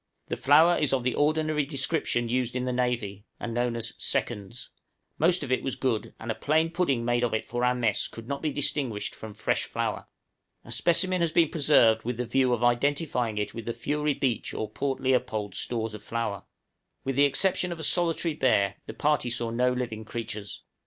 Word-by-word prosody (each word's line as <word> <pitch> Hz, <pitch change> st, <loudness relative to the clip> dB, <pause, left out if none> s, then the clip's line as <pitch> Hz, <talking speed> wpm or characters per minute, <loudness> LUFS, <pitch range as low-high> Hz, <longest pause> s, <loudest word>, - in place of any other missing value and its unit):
The -, -, -1 dB
flour 160 Hz, +5 st, +5 dB
is 150 Hz, -3 st, +2 dB
of 130 Hz, -2 st, +1 dB
the 125 Hz, -, +1 dB
ordinary 155 Hz, 0 st, +1 dB
description 135 Hz, -3 st, 0 dB
used 125 Hz, +1 st, -1 dB
in 125 Hz, 0 st, -1 dB
the 125 Hz, -, -1 dB
navy, 120 Hz, -5 st, -1 dB, 0.2 s
and 120 Hz, -1 st, -4 dB
known 120 Hz, 0 st, 0 dB
as 115 Hz, -, -3 dB
"seconds;" 105 Hz, +4 st, -2 dB, 0.5 s
most 175 Hz, -2 st, +3 dB
of 130 Hz, -, -5 dB
it 130 Hz, -, +2 dB
was 135 Hz, -, -2 dB
good, 120 Hz, -5 st, -2 dB
and 115 Hz, -, -4 dB
a -, -, 0 dB
plain 160 Hz, +6 st, +1 dB
pudding 140 Hz, -10 st, 0 dB
made 120 Hz, 0 st, +1 dB
of 120 Hz, -2 st, +1 dB
it 110 Hz, -, -2 dB
for 120 Hz, +1 st, -3 dB
our 125 Hz, 0 st, +3 dB
mess 115 Hz, -4 st, +1 dB
could 115 Hz, 0 st, -11 dB
not 140 Hz, +1 st, -3 dB
be 155 Hz, -, -1 dB
distinguished 130 Hz, -7 st, -1 dB
from 110 Hz, -2 st, -9 dB
fresh 110 Hz, -, 0 dB
flour. -, -, -3 dB, 0.6 s
A -, -, -10 dB
specimen 185 Hz, +1 st, +2 dB
has 170 Hz, -2 st, +1 dB
been 165 Hz, -2 st, +4 dB
preserved 130 Hz, -8 st, +4 dB
with 120 Hz, 0 st, -3 dB
the 125 Hz, -, -2 dB
view 130 Hz, +1 st, +2 dB
of 120 Hz, -1 st, 0 dB
identifying 125 Hz, -2 st, +1 dB
it 105 Hz, -, -2 dB
with 115 Hz, -1 st, -7 dB
the 115 Hz, -, -1 dB
Fury 150 Hz, +2 st, -1 dB
Beach 125 Hz, -4 st, -1 dB
or 110 Hz, -, -2 dB
Port 135 Hz, +2 st, -2 dB
Leopold 125 Hz, -6 st, 0 dB
stores 110 Hz, +3 st, -2 dB
of 105 Hz, -, -8 dB
flour. 115 Hz, -3 st, -3 dB, 0.6 s
With 135 Hz, 0 st, -2 dB
the 140 Hz, +2 st, +5 dB
exception 180 Hz, +5 st, +1 dB
of 170 Hz, -, -5 dB
a -, -, -4 dB
solitary 170 Hz, 0 st, +2 dB
bear, 100 Hz, -9 st, +2 dB
the -, -, -7 dB
party 150 Hz, -4 st, +1 dB
saw 120 Hz, -1 st, -2 dB
no 125 Hz, +2 st, +2 dB
living 120 Hz, -3 st, -3 dB
creatures. 105 Hz, -2 st, -6 dB
125 Hz, 205 wpm, -27 LUFS, 115-145 Hz, 0.6 s, flour